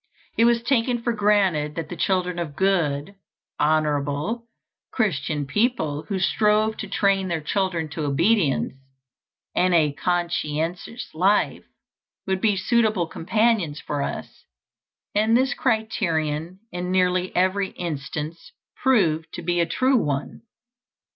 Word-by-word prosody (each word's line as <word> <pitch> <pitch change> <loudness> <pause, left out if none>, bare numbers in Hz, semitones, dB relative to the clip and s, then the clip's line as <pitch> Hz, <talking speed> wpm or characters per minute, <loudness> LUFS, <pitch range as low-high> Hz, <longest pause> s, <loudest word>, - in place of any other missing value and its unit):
It 230 - +4
was 235 0 +3
taken 240 -1 +1
for 235 - +1
granted 195 -8 +2
that 165 -2 -4
the 180 - -5
children 180 0 0
of 155 -4 -4
good, 165 -3 +1 0.5
honorable, 150 +8 0 0.4
Christian 150 - -1
people, 160 - 0
who 200 - -1
strove 215 +3 +2
to 215 - -5
train 195 -1 +1
their 170 -2 -1
children 170 0 -1
to 150 0 -4
obedience 165 +1 +2 0.8
and 180 -1 +3
a 155 -3 +4
conscientious 175 +5 -2
life, 190 +6 +1 0.6
would 190 -1 -1
be 210 -3 +2
suitable 220 -3 +2
companions 180 -2 0
for 145 -1 -3
us; - - -6 0.7
and 220 +3 +3
this 265 +2 +2
criterion 180 - -1
in 180 0 -4
nearly 185 0 +2
every 190 +2 +2
instance 155 0 -5 0.2
proved 165 -11 +2
to 175 - -6
be 175 +1 0
a 170 - +2
true 260 +1 +2
one. 140 +2 -3
180 Hz, 125 wpm, -24 LUFS, 155-210 Hz, 0.8 s, It